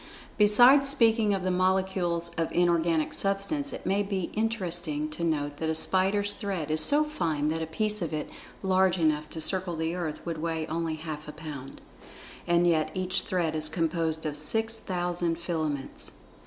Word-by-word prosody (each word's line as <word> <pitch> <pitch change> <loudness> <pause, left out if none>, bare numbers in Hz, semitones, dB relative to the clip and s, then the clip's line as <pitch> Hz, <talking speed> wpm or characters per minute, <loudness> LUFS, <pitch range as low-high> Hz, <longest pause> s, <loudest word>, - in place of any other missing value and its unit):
Besides 245 +7 +6
speaking 225 -5 +3
of 190 - -4
the 185 - 0
molecules 185 -2 0
of 165 -1 -3
inorganic 170 -2 +2
Substance, 200 +9 -1
it - - -8
may 195 +2 +2
be 195 -3 -3
interesting 175 -9 -1
to 160 +2 -5
note 145 -3 -1
that 160 - -2
a 160 - 0
spider's 195 +4 +3
thread 185 -8 -3
is 155 0 +1
so 290 - +5
fine 165 - -1
that 160 +1 -2
a 160 - -3
piece 210 +5 -1
of 170 - -2
it 155 -1 -3 0.4
large 190 -1 +3
enough 155 -2 +1
to 160 - -7
circle 180 +2 +2
the 160 +1 -2
earth 170 -4 -4
would 165 -2 -3
weigh 160 -1 -2
only 165 0 -2
half 155 -1 -7
a - - -5
pound. 150 -3 -9 0.7
And 175 0 +3
yet 160 -3 +2
each 185 0 0
thread 170 -4 -1
is 155 0 0
composed 160 -1 -1
of 150 -1 -2
six 220 +10 -1
thousand 175 -4 -2
filaments. 155 -5 -4
170 Hz, 175 wpm, -28 LUFS, 160-190 Hz, 0.7 s, Besides